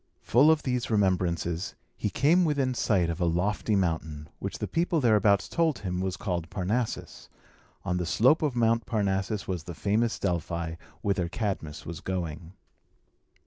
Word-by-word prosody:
Full 135 +7 +5
of 160 -1 +3
these 125 -2 -1
remembrances, 90 -4 0 0.2
he 105 - -2
came 160 - +3
within 140 -5 +1
sight 100 -7 +2
of 85 - -5
a - - +3
lofty 100 +5 0
mountain, 80 -5 -1
which - - -4
the - - -3
people 170 0 +1
thereabouts 105 -5 +3
told 165 -4 +1
him 90 -3 -3
was 95 -1 -2
called 85 -4 -3
Parnassus. 110 +6 -3 0.6
On 90 -2 0
the 90 -2 -2
slope 125 - +4
of 145 -5 0
Mount 115 -1 +2
Parnassus 100 -2 -1
was 90 -4 -3
the 85 - -7
famous 110 +6 +1
Delphi, 85 -2 -2 0.3
whither 95 -4 0
Cadmus 90 -8 -3
was 85 -1 -6
going. 85 -2 -4
95 Hz, 155 wpm, -28 LUFS, 85-115 Hz, 0.6 s, Full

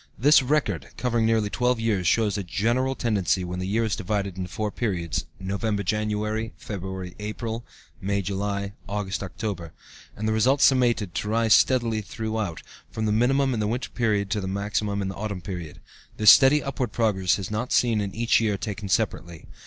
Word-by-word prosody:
This 145 +5 +6
record, 125 - 0
covering 120 -3 +1
nearly 110 -2 +1
twelve 125 -1 +1
years, 105 -6 0
shows 110 0 +2
a 100 - -1
general 120 +9 0
tendency, 100 -7 0
when 90 0 -4
the 90 - -3
year 110 +4 +1
is 110 -2 0
divided 100 -2 -2
into 90 -1 -5
four 105 +3 -3
periods 90 -9 -2
(November 100 +2 -2
January, 105 +2 -1
February 95 -2 -6
April, 110 +2 -4 0.4
May 100 +1 -1
July, 100 +1 -2 0.2
August 100 -2 -3
October) 95 -4 -5 0.4
and 110 +1 -2
the 110 - +1
results 130 +6 +4
summated, 120 -8 +2
to 105 - -3
rise 115 0 +3
steadily 115 -4 +3
throughout, 110 -4 -4 0.3
from 110 - -3
the 105 - +1
minimum 130 +5 +2
in 115 - -2
the 105 - 0
winter 120 +4 -3
period 105 -4 0
to 105 - 0
the 95 - -4
maximum 100 +1 -1
in - - -2
the 95 - -4
autumn 105 -2 -4
period. 90 -6 -6 0.4
This 105 - +9
steady 140 +2 +6
upward 130 -2 -3
progress 100 -6 +1
is 100 0 -5
not 115 +4 -2
seen 115 -3 +3
in 100 -1 -4
each 115 +1 +3
year 105 -3 +1
taken 100 -1 -5
separately. 85 -3 -1
105 Hz, 185 wpm, -25 LUFS, 100-115 Hz, 0.4 s, This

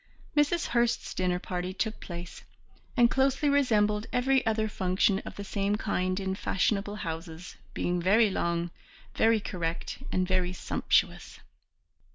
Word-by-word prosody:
Mrs. 300 +3 +2
Hurst's 235 -1 +1
dinner 180 -1 0
party 180 0 -4
took 220 +2 -2
place, 175 0 -8 0.5
and 240 -1 +7
closely 270 +2 +2
resembled 215 -7 +2
every 265 +2 +2
other 220 0 +1
function 190 -1 +1
of - - -7
the 200 - -6
same 200 0 0
kind 185 -3 -1
in 190 -1 -2
fashionable 200 +2 0
houses, 165 -1 -6 0.2
being 175 0 0
very 205 +4 +4
long, 170 -1 -1 0.4
very 225 0 +3
correct 170 -4 -4
and 185 -1 +1
very 185 -1 +1
sumptuous. - - 0
200 Hz, 135 wpm, -29 LUFS, 180-225 Hz, 0.5 s, and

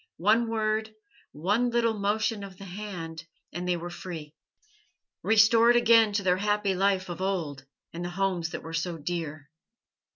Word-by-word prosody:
One 220 +6 +3
word, 220 -1 -1 0.4
one 205 +11 +1
little 235 -1 +2
motion 210 +1 -1
of 195 -2 -10
the 195 - -10
hand, 175 -4 -7 0.3
and 175 +1 -4
they 180 -1 +1
were 175 +1 -6
free, 165 -4 -8 0.9
restored 225 +2 +5
again 230 -2 +5
to 200 0 0
their 180 -1 +3
happy 205 0 +1
life 190 0 +1
of 175 0 -6
old 160 -8 -2 0.3
and 170 +1 -5
the 175 - -3
homes 180 -2 -1
that - - -6
were 160 - -8
so 165 +1 -2
dear. 155 -2 -5
195 Hz, 160 wpm, -27 LUFS, 170-215 Hz, 0.9 s, restored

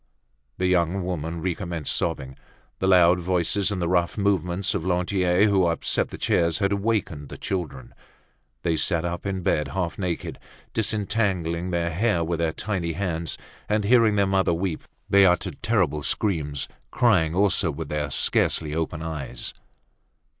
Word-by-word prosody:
The 90 - 0
young 90 +1 +2
woman 85 -2 -3
recommenced 85 -4 -2
sobbing. 65 0 -2 0.4
The 95 - 0
loud 90 -1 +6
voices 90 +3 +1
and 100 -3 -2
the 85 - 0
rough 85 +1 +1
movements 95 -2 0
of 95 - -2
Lantier, 90 +1 +2
who 95 -4 +3
upset 85 - 0
the - - -9
chairs, 85 -1 +2
had 100 -1 +1
awakened 100 -9 -1
the - - -8
children. 80 -9 -4 0.7
They 80 -2 +1
sat 85 +1 +1
up 85 +3 -3
in 95 -2 -3
bed, 75 -3 +1
half 85 +5 -3
naked, 90 -3 -3 0.3
disentangling 95 -6 0
their 85 -1 -1
hair 90 0 +1
with 85 0 -2
their 85 -1 +1
tiny 90 -4 -3
hands, 85 -3 -3 0.3
and, 105 0 +1
hearing 115 0 +4
their 100 -1 +3
mother 95 -3 +2
weep, 85 -2 -3 0.2
they 100 0 +6
uttered 90 -2 +1
terrible 90 -10 +1
screams, 75 -5 -1 0.2
crying 90 -10 +2
also 100 -2 +3
with 70 - -5
their 75 -1 -2
scarcely 75 +2 +1
open 80 0 -2
eyes. 70 -6 -5
90 Hz, 155 wpm, -25 LUFS, 80-100 Hz, 0.7 s, loud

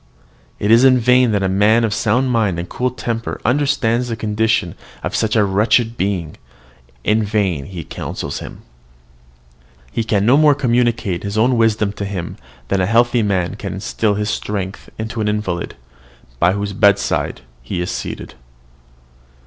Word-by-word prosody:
"It 105 - 0
is 115 +2 +6
in 130 -1 +6
vain 125 0 +4
that 100 -2 +1
a - - +2
man 105 +5 +3
of 110 -2 0
sound 125 +5 +1
mind 105 -7 +1
and 85 +1 -4
cool 125 +1 -1
temper 115 -2 -4
understands 125 -3 +1
the 115 - -3
condition 110 -4 0 0.3
of - - -3
such 110 0 0
a 110 - +4
wretched 110 +4 +2
being, 95 -6 -2 0.7
in 110 +1 +2
vain 100 -9 -1
he 90 -4 -7
counsels - - -5
him. - - -10 1.3
He 115 - -1
can 105 -2 +1
no 125 +5 +5
more 150 -1 +5
communicate 120 -8 0
his 100 +1 -4
own 120 +4 +3
wisdom 110 -3 +2
to 100 - -5
him 95 -4 -5 0.3
than 100 -1 +1
a 90 - +1
healthy 120 +2 +3
man 95 -4 0
can - - -5
instil 110 +1 -1
his 105 +1 -1
strength 100 -2 -4
into 110 0 -3
the 105 - 0
invalid, 105 -5 -3 0.6
by 90 +6 +4
whose 100 0 -3
bedside 100 - +2 0.2
he 75 +9 -4
is 90 - -2
seated." - - -6
105 Hz, 165 wpm, -18 LUFS, 100-115 Hz, 1.3 s, is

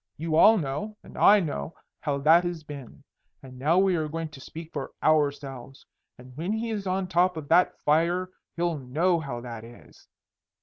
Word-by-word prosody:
You 160 0 -2
all 220 +7 +7
know 160 +7 -4
and - - -14
I 210 +1 +6
know 110 - -4 0.2
how 140 -1 -1
that 165 +4 +6
has 175 -3 -4
been. 140 -5 -10 0.4
And 130 -1 -12
now 155 +6 +2
we 190 -1 +3
are 155 -2 -1
going 165 +1 -4
to 145 -3 -13
speak 160 +4 -10
for 140 -3 -5
ourselves. 140 -3 0 0.3
And 125 0 -14
when 170 +8 -2
he 225 +1 -2
is 205 -3 -4
on 185 +1 0
top 180 -1 +2
of 150 -2 -7
that 175 +2 +3
fire 170 +4 +2 0.2
he'll 170 -2 -1
know 165 +7 +1
how 135 -6 -5
that 115 -2 -8
is. 120 +1 -16
160 Hz, 185 wpm, -26 LUFS, 140-180 Hz, 0.4 s, all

